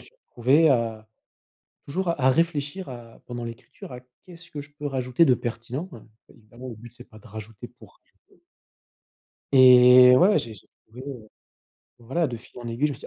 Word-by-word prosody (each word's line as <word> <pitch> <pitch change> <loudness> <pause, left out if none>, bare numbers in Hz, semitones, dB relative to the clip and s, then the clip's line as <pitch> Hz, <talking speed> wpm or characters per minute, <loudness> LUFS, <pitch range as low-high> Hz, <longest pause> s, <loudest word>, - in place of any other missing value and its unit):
suis - - -16 0.2
retrouvé 135 +7 +3
à, 115 -4 -2 0.8
toujours 185 +6 -4
à 165 - -2
à 130 - +4
réfléchir 165 +3 -2
à 120 -2 -12
pendant 120 -1 -7
l'écriture 115 +3 -11
à: 125 - -8 0.3
«Qu'est-ce 175 -1 -15
que 150 - -7
je 145 - -16
peux 145 -1 -5
rajouter 130 +2 0
de 130 - +4
pertinent?», 120 +8 -6
hein, 115 - -14 0.3
évidemment 120 +3 -13
le 115 - -9
but 120 +2 -14
c'est 120 +1 -15
pas 110 - -16
de 105 - -17
rajouter 110 0 -10
pour - - -20 0.3
rajouter - - -29 1.1
et 125 -1 +7
ouais, 195 +8 +4
j'ai 115 -1 -8
j'ai - - -20 0.2
trouvé, 125 +4 -12
heu, 120 -6 -9 0.7
enfin 120 - -20
voilà, 165 +7 0
de 120 -4 -6
fil 120 +2 -15
en 120 - -7
aiguille, 120 +6 -1
je - - -4
me - - -7
suis - - -12
125 Hz, 200 wpm, -24 LUFS, 115-145 Hz, 1.1 s, et